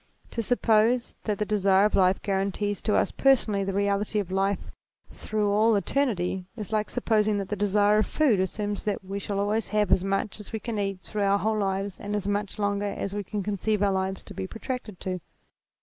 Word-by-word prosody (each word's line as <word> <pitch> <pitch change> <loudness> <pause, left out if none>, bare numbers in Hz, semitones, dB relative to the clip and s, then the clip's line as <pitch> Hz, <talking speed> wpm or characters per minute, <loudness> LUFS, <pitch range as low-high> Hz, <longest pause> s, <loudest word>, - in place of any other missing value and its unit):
To 230 - -2
suppose 230 +1 +2
that 210 -2 0
the 210 - -1
desire 200 -2 +3
of 210 - +1
life 185 0 +3
guarantees 200 +1 -1
to 215 - +1
us - - +2
personally 235 -7 +3
the 195 - -2
reality 200 +2 0
of 195 -3 -1
life 195 0 0 0.4
through 210 -1 -1
all 215 +2 +4
eternity, 190 -4 0
is 215 -1 -6
like 215 0 0
supposing 215 -3 +1
that 195 -1 -3
the 210 - -1
desire 205 +1 +3
of 215 - +1
food 270 -11 +2
assures 205 +2 -2
us - - -10
that 205 -2 -2
we 195 +1 -4
shall 200 0 -3
always 210 +2 0
have 210 -1 +1
as 185 - +4
much 195 +2 -1
as 210 - -9
we 220 - -3
can 225 -1 -4
eat 195 -2 -2
through 210 - -4
our 200 0 +3
whole 215 +1 0
lives 195 -1 -2
and 205 +1 -3
as 200 -2 -2
much 205 0 -2
longer 205 0 0
as 200 - -3
we 205 0 -2
can 205 +1 -4
conceive 210 +1 0
our 200 - +3
lives 190 0 -2
to - - -10
be 190 - -4
protracted 225 -3 -6
to. 185 -1 -3
205 Hz, 215 wpm, -27 LUFS, 195-215 Hz, 0.4 s, all